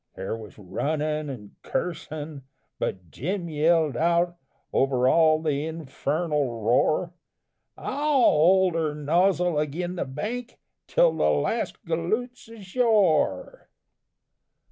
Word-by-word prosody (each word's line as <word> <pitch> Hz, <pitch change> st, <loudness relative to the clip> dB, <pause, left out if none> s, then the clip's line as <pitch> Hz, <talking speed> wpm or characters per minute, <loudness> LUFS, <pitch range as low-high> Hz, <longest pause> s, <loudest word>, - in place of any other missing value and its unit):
There 95 Hz, +3 st, -4 dB
was 110 Hz, -2 st, -11 dB
runnin' 150 Hz, -, -2 dB
and 105 Hz, -7 st, -8 dB
cursin', 155 Hz, -4 st, -4 dB, 0.4 s
but 90 Hz, -4 st, -4 dB
Jim 180 Hz, +5 st, -3 dB
yelled 155 Hz, -2 st, +2 dB
out 170 Hz, +3 st, +2 dB, 0.4 s
Over 130 Hz, -2 st, +2 dB
all 155 Hz, +1 st, +5 dB
the 150 Hz, -1 st, -1 dB
infernal 150 Hz, -4 st, -2 dB
roar, 155 Hz, +9 st, +2 dB, 0.6 s
"I'll 285 Hz, -, -4 dB, 0.2 s
hold 185 Hz, 0 st, +5 dB
her 160 Hz, -2 st, -1 dB
nozzle 175 Hz, +2 st, +2 dB
agin 175 Hz, +5 st, -3 dB
the -, -, -1 dB
bank 220 Hz, -, -5 dB, 0.3 s
Till -, -, +4 dB
the -, -, +2 dB
last -, -, -1 dB
galoot's 220 Hz, +10 st, -2 dB
ashore." 205 Hz, -, +1 dB
160 Hz, 105 wpm, -25 LUFS, 145-180 Hz, 0.6 s, all